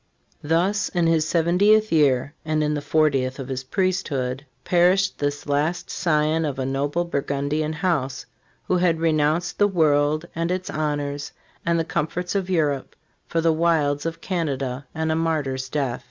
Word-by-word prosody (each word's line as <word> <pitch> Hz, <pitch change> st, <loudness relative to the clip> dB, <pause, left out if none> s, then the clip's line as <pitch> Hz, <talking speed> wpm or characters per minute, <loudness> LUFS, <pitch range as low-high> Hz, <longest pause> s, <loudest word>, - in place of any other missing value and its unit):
f 145 Hz, -, -8 dB
Thus, 185 Hz, +5 st, +2 dB
in 175 Hz, -2 st, 0 dB
his 160 Hz, -1 st, +2 dB
seventieth 195 Hz, +7 st, +3 dB
year, 140 Hz, -3 st, +3 dB
and 155 Hz, -1 st, 0 dB
in 150 Hz, 0 st, 0 dB
the 145 Hz, -, -2 dB
fortieth 140 Hz, -4 st, +1 dB
of 135 Hz, -1 st, -7 dB
his 130 Hz, -1 st, -3 dB
priesthood, 140 Hz, -7 st, -1 dB, 0.2 s
perished 185 Hz, +2 st, +3 dB
this 145 Hz, 0 st, -2 dB
last 145 Hz, +4 st, -1 dB
scion 155 Hz, -1 st, +1 dB
of 145 Hz, -4 st, -2 dB
a 130 Hz, -, -2 dB
noble 145 Hz, +6 st, -1 dB
Burgundian 145 Hz, 0 st, -1 dB
house, 150 Hz, -5 st, -1 dB, 0.4 s
who 185 Hz, -, +1 dB
had 175 Hz, -2 st, +2 dB
renounced 160 Hz, +1 st, +1 dB
the 205 Hz, -, +5 dB
world 155 Hz, -3 st, +2 dB
and 165 Hz, +1 st, -2 dB
its 185 Hz, +1 st, -2 dB
honors 145 Hz, -1 st, -3 dB, 0.3 s
and 170 Hz, 0 st, +3 dB
the 165 Hz, -, 0 dB
comforts 165 Hz, +4 st, -2 dB
of 195 Hz, -2 st, -1 dB
Europe 150 Hz, -7 st, 0 dB, 0.3 s
for 165 Hz, -, 0 dB
the 165 Hz, 0 st, +3 dB
wilds 155 Hz, -3 st, +1 dB
of 165 Hz, 0 st, -5 dB
Canada 140 Hz, -7 st, -3 dB
and 160 Hz, 0 st, -1 dB
a -, -, +1 dB
martyr's 145 Hz, -5 st, -1 dB
death. 135 Hz, -4 st, -1 dB
155 Hz, 165 wpm, -23 LUFS, 145-170 Hz, 0.4 s, the